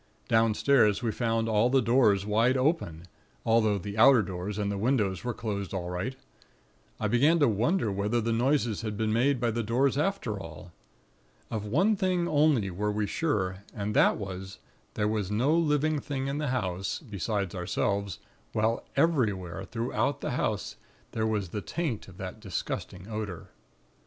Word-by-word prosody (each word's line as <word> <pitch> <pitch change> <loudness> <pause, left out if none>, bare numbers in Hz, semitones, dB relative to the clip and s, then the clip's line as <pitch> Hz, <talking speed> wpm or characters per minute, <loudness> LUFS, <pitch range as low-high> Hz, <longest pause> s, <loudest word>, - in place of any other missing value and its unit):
Downstairs 115 0 +3
we 115 - +1
found 115 -1 0
all 110 +2 +3
the 135 +1 +4
doors 115 -6 +3
wide 115 +5 +2
open; 130 - 0 0.4
although 110 -2 +3
the 100 +2 -5
outer 125 -1 +7
doors 95 +2 -5
and 100 -1 -1
the 100 - -2
windows 105 -5 +1
were 120 - -1
closed 100 -3 -4
all 90 -1 -3
right. 105 +9 -3 0.8
I 110 - 0
began 140 +10 +4
to 145 -4 +4
wonder 115 - +1
whether 105 +4 0
the 115 0 -1
noises 120 -2 +1
had 110 -2 -4
been 110 0 0
made 130 +3 +2
by 120 -1 +1
the 115 +1 -1
doors 130 +5 +1
after 150 - -1
all. 85 0 -10 0.8
Of 110 -2 -3
one 185 - +2
thing 185 -3 0
only 145 - +3
were 105 +4 -1
we 105 0 -1
sure, 100 - -1 0.2
and 105 -1 -3
that - - +5
was, 95 -1 -6 0.4
there 105 - +1
was 105 -3 -1
no 120 +9 +2
living 155 -2 +2
thing 135 -2 -4
in 140 +2 -2
the 150 - -1
house, 95 -7 -2
beside 100 - -3
ourselves, 100 +1 -1 0.4
while 110 +2 +1
everywhere 100 - +1
throughout 120 +5 -1
the - - -2
house, - - -2 0.3
there 110 -1 -1
was 105 -4 -1
the 105 - -4
taint 150 - -3
of 95 -2 -14
that 95 +3 -7
disgusting 95 -1 -5
odor. 105 -6 -5
110 Hz, 165 wpm, -28 LUFS, 100-130 Hz, 0.8 s, outer